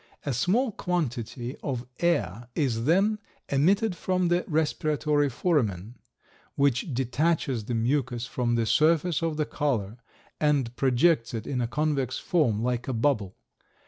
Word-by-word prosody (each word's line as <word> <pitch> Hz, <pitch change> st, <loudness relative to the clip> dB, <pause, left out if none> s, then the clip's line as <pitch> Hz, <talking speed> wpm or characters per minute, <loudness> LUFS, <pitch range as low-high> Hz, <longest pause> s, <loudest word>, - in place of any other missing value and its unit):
A 140 Hz, -, -1 dB
small 220 Hz, -, +1 dB
quantity 130 Hz, -, -3 dB
of 125 Hz, -3 st, -4 dB
air 120 Hz, -, 0 dB
is 120 Hz, -7 st, 0 dB
then 200 Hz, +7 st, +3 dB, 0.3 s
emitted 185 Hz, +8 st, +2 dB
from 185 Hz, 0 st, 0 dB
the 175 Hz, +1 st, +2 dB
respiratory 150 Hz, -2 st, +1 dB
foramen, 115 Hz, -, 0 dB, 0.6 s
which 140 Hz, +1 st, +1 dB
detaches 130 Hz, -1 st, 0 dB
the 120 Hz, -, -2 dB
mucus 120 Hz, 0 st, 0 dB
from 120 Hz, -1 st, -1 dB
the 115 Hz, -1 st, +1 dB
surface 160 Hz, +6 st, +2 dB
of 165 Hz, -2 st, -1 dB
the 155 Hz, -, +1 dB
collar, 120 Hz, -10 st, -2 dB, 0.4 s
and 140 Hz, -6 st, +1 dB
projects 130 Hz, +1 st, +2 dB
it 110 Hz, -1 st, -4 dB
in 125 Hz, -3 st, -2 dB
a 120 Hz, -, 0 dB
convex 140 Hz, -1 st, -1 dB
form, 120 Hz, -11 st, +1 dB
like 125 Hz, -1 st, -1 dB
a 130 Hz, -, -1 dB
bubble. 110 Hz, -6 st, 0 dB
140 Hz, 140 wpm, -27 LUFS, 120-160 Hz, 0.6 s, then